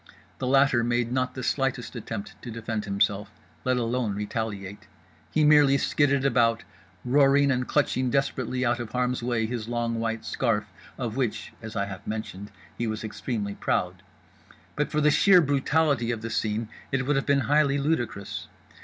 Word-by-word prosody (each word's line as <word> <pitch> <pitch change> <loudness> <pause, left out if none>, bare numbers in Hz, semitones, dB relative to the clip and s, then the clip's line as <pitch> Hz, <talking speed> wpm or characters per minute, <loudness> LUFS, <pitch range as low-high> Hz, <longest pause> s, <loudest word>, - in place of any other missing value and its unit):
The 130 - -2
latter 135 -2 +4
made 120 0 0
not 130 0 -1
the 130 - -5
slightest 135 -2 -1
attempt 110 -3 -6
to - - -8
defend 110 -2 -4
himself, 100 0 0 0.3
let 130 -1 +1
alone 120 -3 -1
retaliate; 105 -2 -4 0.4
he 155 - +2
merely 150 -2 +6
skidded 140 -1 +2
about, 115 -3 +3 0.4
roaring 140 +2 +4
and 125 -1 0
clutching 130 -3 +1
desperately 130 -1 0
out 120 0 +1
of 120 -2 -6
harm's 125 0 0
way 120 -2 0
his 115 -1 -4
long 120 -1 -1
white 115 0 -2
scarf, 110 -5 0 0.3
of 120 -2 -4
which 120 -3 -2
(as 110 -1 -8
I 100 - 0
have 95 -2 -9
mentioned) 105 -2 -5 0.3
he 120 - -2
was 110 0 -3
extremely 105 -1 -3
proud. - - -1 0.7
But 150 - 0
for 150 - 0
the 150 0 +5
sheer 185 +4 +6
brutality 145 -3 +2
of 115 -2 -2
the 115 - -4
scene 110 0 -1 0.2
it 130 -1 0
would 145 +1 +1
have 135 - -1
been 140 -1 +3
highly 145 0 +3
ludicrous. 120 -9 -2
120 Hz, 170 wpm, -26 LUFS, 110-135 Hz, 0.7 s, merely